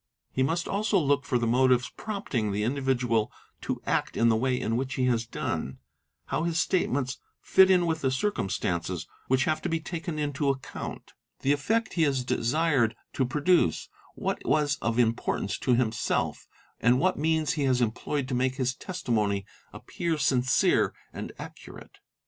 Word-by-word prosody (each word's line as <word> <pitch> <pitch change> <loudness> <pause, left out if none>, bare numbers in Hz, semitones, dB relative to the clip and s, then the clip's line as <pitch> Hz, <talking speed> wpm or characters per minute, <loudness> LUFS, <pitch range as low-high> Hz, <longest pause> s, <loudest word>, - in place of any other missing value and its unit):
He 130 - -1
must 165 +6 0
also 205 0 +1
look 145 -4 +2
for 135 -3 +1
the 120 - 0
motives 125 +1 +3
prompting 150 - -2
t] 100 - -2
2 105 - 0
individual 125 -4 0 0.3
to - - -4
act - - -1
in 115 - +4
the 110 - +4
way 125 +2 +1
in 115 - -1
which 130 +1 -2
he 130 - +1
has 120 -2 +1
done, 65 - -3 0.5
how 145 - -1
his 165 0 -1
state 185 +1 +1
ments 130 -1 -2 0.2
fit 190 0 +5
in 180 -2 +4
with 160 -1 -1
the 130 - +2
circumstances 95 - -1 0.2
which 130 +1 +3
have 155 +1 0
to - - -2
be 165 -1 0
taken 165 0 -5
into 145 -1 0
account, 135 -1 -5 0.3
the 140 - +2
effect 220 +11 0
he 165 - +2
is 135 -4 +1
desired 130 -1 +1 0.2
to 130 - +1
produce, 145 - +2 0.3
what - - -3
was 150 -1 +2
of 115 0 -1
importance 115 -2 0
to 125 - +2
himself, 115 -2 -1 0.3
and 125 +2 +4
what 185 0 +1
means 160 +1 +1
he 150 -5 0
has 130 -2 +2
employed 125 +4 -1
to 130 - -4
make 130 +1 +1
his 130 -2 0
testimony 110 - -1 0.3
appear 170 -2 -3
sincere 130 -3 +2
| - - -35
md - - -5
accurate. - - -11
130 Hz, 175 wpm, -27 LUFS, 120-160 Hz, 0.5 s, fit